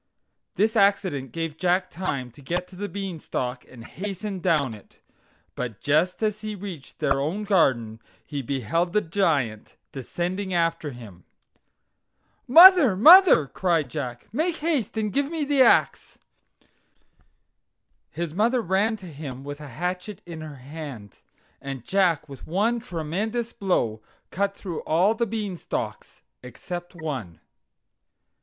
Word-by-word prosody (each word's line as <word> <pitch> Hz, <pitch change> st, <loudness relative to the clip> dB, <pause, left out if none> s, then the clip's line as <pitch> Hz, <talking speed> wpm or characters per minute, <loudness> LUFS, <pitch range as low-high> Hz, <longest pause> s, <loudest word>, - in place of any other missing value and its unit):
This 220 Hz, +2 st, +1 dB
accident 195 Hz, -, +2 dB
gave 165 Hz, 0 st, -4 dB
Jack 180 Hz, 0 st, +1 dB
time 140 Hz, -9 st, -3 dB
to 125 Hz, -, -16 dB
get 175 Hz, +6 st, -4 dB
on 180 Hz, -, -12 dB
the 205 Hz, 0 st, -3 dB
Bean 195 Hz, -4 st, -5 dB
stalk 125 Hz, -3 st, -4 dB
and 120 Hz, -3 st, -12 dB
hasten 195 Hz, +1 st, -5 dB
down 155 Hz, -9 st, +1 dB
it; 105 Hz, -, -16 dB, 0.5 s
but 120 Hz, -3 st, -5 dB
just 155 Hz, -, +1 dB
as 215 Hz, 0 st, -1 dB
he 215 Hz, -1 st, -5 dB
reached 185 Hz, -8 st, -9 dB
their 135 Hz, 0 st, +1 dB
own 175 Hz, +9 st, -2 dB
garden 125 Hz, -, +1 dB, 0.3 s
he 145 Hz, -2 st, -4 dB
beheld 140 Hz, -, -1 dB
the 210 Hz, -, +3 dB
Giant 150 Hz, -, -1 dB, 0.2 s
descending 180 Hz, +8 st, -3 dB
after 165 Hz, -2 st, 0 dB
him. 110 Hz, -, -12 dB, 1.2 s
"Mother! 335 Hz, -, +9 dB
mother!" 325 Hz, -, +8 dB
cried 165 Hz, -1 st, 0 dB
Jack, 125 Hz, -4 st, -6 dB
"make 320 Hz, +6 st, 0 dB
haste 295 Hz, -, -1 dB
and 215 Hz, -2 st, -1 dB
give 280 Hz, 0 st, 0 dB
me 320 Hz, -3 st, -2 dB
the 280 Hz, -1 st, +2 dB
ax." -, -, +3 dB, 1.9 s
His 170 Hz, -2 st, -5 dB
mother 230 Hz, +7 st, +2 dB
ran 200 Hz, +5 st, +1 dB
to 195 Hz, -, -12 dB
him 140 Hz, -5 st, -8 dB
with 145 Hz, +1 st, -7 dB
a 150 Hz, -, -8 dB
hatchet 180 Hz, -, -5 dB
in 165 Hz, -2 st, -8 dB
her 155 Hz, -2 st, -8 dB
hand, 135 Hz, -, -9 dB, 0.4 s
and 135 Hz, -3 st, -7 dB
Jack 180 Hz, -6 st, +1 dB
with 140 Hz, -2 st, -11 dB
one 215 Hz, +8 st, +1 dB
tremendous 215 Hz, +5 st, -3 dB
blow 120 Hz, -, -1 dB, 0.3 s
cut 200 Hz, +1 st, -1 dB
through 180 Hz, -6 st, -6 dB
all 180 Hz, +7 st, +2 dB
the 235 Hz, +1 st, -1 dB
Beanstalks 205 Hz, -5 st, -5 dB, 0.2 s
except 175 Hz, +9 st, -8 dB
one. 135 Hz, -, -5 dB
175 Hz, 135 wpm, -25 LUFS, 140-205 Hz, 1.9 s, Mother